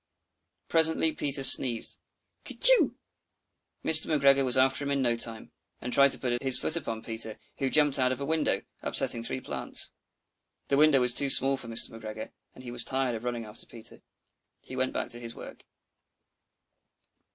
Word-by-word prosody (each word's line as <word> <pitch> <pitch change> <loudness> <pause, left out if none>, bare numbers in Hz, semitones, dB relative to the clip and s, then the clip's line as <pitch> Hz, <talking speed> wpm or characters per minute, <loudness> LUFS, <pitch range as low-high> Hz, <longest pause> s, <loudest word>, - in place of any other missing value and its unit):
Presently 160 0 -1
Peter 140 -2 -2
sneezed 125 -3 +7 0.4
"Kertyschoo!" - - +5 0.9
Mr. 160 0 +6
McGregor 140 -3 0
was 130 0 0
after 135 +2 0
him 140 - -6
in 140 -1 -3
no 120 -1 -2
time, 115 -1 -2 0.3
and 125 0 -8
tried 140 0 +3
to - - -4
put 120 -2 -5
his 135 -2 +5
foot - - -1
upon 115 -1 -6
Peter, 110 -1 -4 0.2
who 135 - -3
jumped 145 -1 +1
out 130 0 -1
of 130 - -6
a 140 - -6
window, 150 -10 -3 0.2
upsetting 115 - -2
three 115 - -5
plants. - - -6 0.8
The 140 - -1
window 150 -3 +2
was 125 0 0
too 140 +2 +1
small 135 +1 +1
for 130 -3 -9
Mr. 115 0 +3
McGregor, 110 -1 -11 0.2
and 130 - -16
he 120 - -10
was 120 -1 -2
tired 130 -1 -3
of 115 0 -9
running 120 -2 -7
after 105 +1 -12
Peter. 115 -2 -12 0.6
He 130 - -12
went 130 0 -4
back - - -6
to 120 0 -7
his 115 -1 -8
work. - - -14
130 Hz, 175 wpm, -25 LUFS, 120-140 Hz, 0.9 s, sneezed